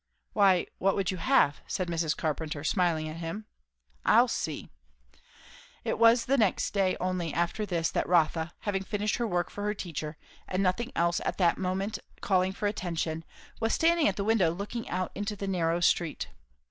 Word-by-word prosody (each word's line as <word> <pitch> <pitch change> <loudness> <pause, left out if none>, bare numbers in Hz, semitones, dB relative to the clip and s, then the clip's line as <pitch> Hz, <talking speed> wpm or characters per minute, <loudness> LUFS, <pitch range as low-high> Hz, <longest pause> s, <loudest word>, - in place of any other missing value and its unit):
"Why 195 -4 +4
what 195 0 +2
would 195 -2 0
you 185 - -4
have?" 145 -3 +3
said 185 - -2
Mrs. 165 -2 -1
Carpenter, 155 -1 -2
smiling 165 -2 +1
at 155 +1 -6
him. 170 +6 -5 0.6
"I'll - - +6
see." - - -3 1.1
It - - -2
was 230 +1 +6
the 275 +1 +2
next 210 -5 +2
day 195 -2 +2
only 180 -3 -1
after 175 +5 -1
this 170 -3 0
that - - -1
Rotha, 165 -1 +2
having 195 -2 -1
finished 205 +2 -1
her 235 - 0
work 175 -3 -1
for 205 - -6
her 210 0 0
teacher 155 -4 -5 0.3
and 185 +1 0
nothing 215 +7 0
else 170 0 +1
at - - -2
the 175 -3 +4
moment 190 +3 -2 0.2
calling 185 -1 +2
for 200 +2 -5
attention, 165 -5 -2 0.4
was 225 0 +1
standing 335 0 +3
at 195 - +1
the 200 - -2
window 210 -5 +3
looking 200 +7 -5
out 185 0 -2
into 205 +1 -3
the 200 -1 -5
narrow 170 -3 +1
street. 170 -2 +1
185 Hz, 180 wpm, -29 LUFS, 170-205 Hz, 1.1 s, I'll